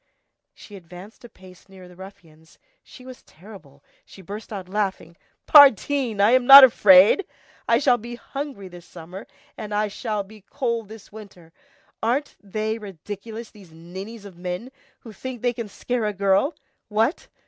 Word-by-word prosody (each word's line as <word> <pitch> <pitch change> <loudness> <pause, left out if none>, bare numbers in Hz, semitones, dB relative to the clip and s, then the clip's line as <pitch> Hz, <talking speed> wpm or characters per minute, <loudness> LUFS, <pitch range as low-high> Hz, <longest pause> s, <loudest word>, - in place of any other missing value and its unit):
She 205 - -14
advanced 185 +4 -14
a 240 - -12
pace 185 -1 -19
nearer 190 -1 -15
the 180 - -17
ruffians, 170 -4 -16 0.3
she 255 - -16
was 255 -1 -12
terrible, 160 -7 -17 0.2
she 190 - -16
burst 205 +5 -9
out 195 -4 -7
laughing:— 190 -4 -4 0.3
"Pardine! 275 -4 +4
I'm 245 +5 +3
not 275 0 +12
afraid. 205 - +6 0.4
I - - +3
shall 245 -4 +2
be 240 +2 -9
hungry 270 -4 -8
this 175 -1 -14
summer, 180 +4 -11 0.3
and 210 -1 -6
I 210 0 -1
shall 210 0 -4
be 215 +2 -17
cold 235 -1 -4
this 220 -2 -14
winter. 190 -6 -14 0.5
Aren't 255 +6 -2
they 215 +2 -4
ridiculous, 210 +4 -10
these 195 -6 -18
ninnies 190 +7 -11
of 185 -4 -14
men, 180 +8 -6 0.3
to 225 -4 -12
think 245 +3 -9
they 245 -1 0
can 230 -2 -7
scare 235 +2 -4
a 210 - -3
girl! 195 - 0 0.3
What! 225 - -1
210 Hz, 160 wpm, -22 LUFS, 185-235 Hz, 0.5 s, not